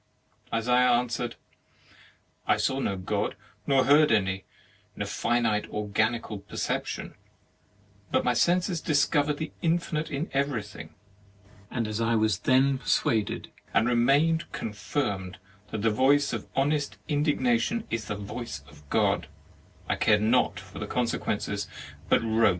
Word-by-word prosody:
Isaiah 125 +2 +3
answered: 120 0 -1 1.1
"I - - +4
saw 135 - 0
no 100 -7 -1
God, 95 - -2 0.3
nor 135 -2 +4
heard 150 0 +6
any, 95 -3 +1 0.5
in - - -3
a - - -4
finite 115 -3 0
organical 105 +1 -1
perception: 100 +1 -3 1.0
but - - +1
my 125 - +3
senses 175 +5 +2
discovered 145 -1 +2
the 160 - -4
infinite 165 -2 0
in 145 +4 -2
everything; 135 -7 -3 0.7
and 115 -3 -2
as 110 +1 -3
I 115 0 +2
was 110 -1 +2
then 130 +1 +3
persuaded, 110 -4 0 0.2
and 110 - +4
remained 140 +7 +3
confirmed, 100 -4 -3 0.3
that 105 -2 -4
the 115 - +3
voice 135 +5 +3
of - - -4
honest 145 +1 0
indignation 145 - +1
is 115 -2 -2
the 105 - -3
voice 100 - -6
of 75 0 -18
God, - - +2 0.6
I - - 0
cared 105 0 +3
not 120 +3 +2
for - - -8
consequences, - - -1 0.4
but - - +4
wrote.' 110 -1 +3
120 Hz, 130 wpm, -27 LUFS, 110-145 Hz, 1.1 s, heard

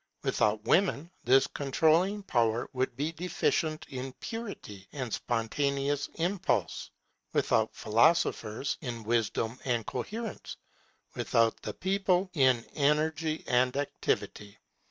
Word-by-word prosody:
Without 105 0 +1
women 175 - +2
this 135 +2 +6
controlling 160 +10 +2
power 115 - +1
would 130 -1 -1
be 150 +4 -1
deficient 160 -2 -1
in 130 0 -5
purity 200 - -7
and 130 -6 -4
spontaneous 140 +4 -1
impulse; 165 - -1 0.4
without - - +2
philosophers, 115 -1 +2
in 120 -5 -5
wisdom 115 +1 0
and 120 -4 0
coherence; 215 - -5 0.6
without 115 -1 +1
the - - -5
people, 190 -1 +1
in 130 -6 +3
energy 155 +2 +1
and 125 +2 +2
activity. 105 -7 -2
140 Hz, 105 wpm, -30 LUFS, 120-165 Hz, 0.6 s, this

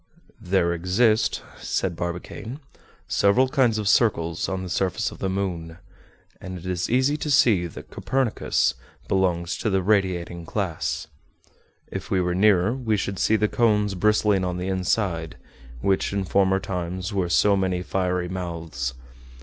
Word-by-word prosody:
"There 90 -3 +1
exist," 105 +6 +2 0.2
said 90 -3 -1
Barbicane, 90 - -5 0.5
"several 120 +7 +3
kinds 130 -5 +2
of 105 -2 -2
circles 85 -7 +2
on 95 0 -3
the - - -5
surface 95 0 0
of - - -12
the 95 - -1
moon, 90 -4 -3 0.6
and 95 -1 -6
it 85 - -11
is 90 -1 -2
easy 130 +4 +2
to 150 - -4
see 110 -10 +4
that 80 - -11
Copernicus 130 -4 0 0.3
belongs 90 -2 +1
to - - -1
the 95 -2 +1
radiating 90 -4 0
class. 85 -2 -2 0.9
If - - -5
we 95 - +2
were 90 -1 0
nearer, 100 +2 +4
we 115 -5 0
should 100 -2 -3
see 110 - +3
the 105 0 +2
cones 105 -3 +2
bristling 105 0 +2
on 90 -1 -2
the 90 +1 -3
inside, 90 -3 -1 0.4
which 95 +3 +1
in 100 -1 0
former 95 0 +2
times 95 +1 -4
were 95 -3 0
so 100 +3 +4
many 95 -2 0
fiery 90 -1 -1
mouths. 85 -8 -4
95 Hz, 150 wpm, -24 LUFS, 90-105 Hz, 0.9 s, see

